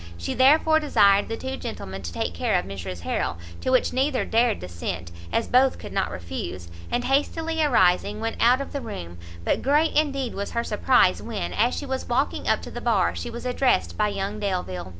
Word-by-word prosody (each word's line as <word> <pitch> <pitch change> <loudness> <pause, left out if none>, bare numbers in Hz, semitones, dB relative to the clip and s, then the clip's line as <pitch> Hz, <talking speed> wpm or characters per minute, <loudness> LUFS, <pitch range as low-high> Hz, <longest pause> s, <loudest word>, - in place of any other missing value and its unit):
She 85 - -3
therefore 310 +4 +5
desired 200 -10 +4
the 225 - -3
two 265 0 -5
gentlemen 95 - -6
to 85 -2 -6
take 85 0 -3
care 85 - +1
of - - -2
Mrs 90 -2 -6
Harrel, 85 0 -2 0.2
to - - -2
which 255 -1 +2
neither 265 +1 +1
dared 230 -1 +2
dissent, 85 -1 -5 0.2
as - - +1
both 255 +1 +4
could - - -9
not 195 -1 0
refuse, 85 0 -6 0.2
and 245 - 0
hastily 320 +4 0
arising, 205 -6 +3
went 225 0 -3
out 250 +3 +4
of 275 - -7
the 280 - -3
room; 85 - -7 0.3
but - - +1
great 295 +4 +2
indeed 275 -5 +1
was 200 +1 -5
her 235 - 0
surprize 215 -3 +3
when, 225 -3 -4
as 235 +4 +2
she 290 - -4
was 265 -2 -4
walking 260 +4 0
up - - +2
to - - -8
the - - -6
bar, - - +2
she - - -5
was 235 +1 -7
addressed 250 +1 +1
by 210 - +1
young 200 +1 -3
Delvile! 180 - -3
230 Hz, 205 wpm, -24 LUFS, -, 0.3 s, therefore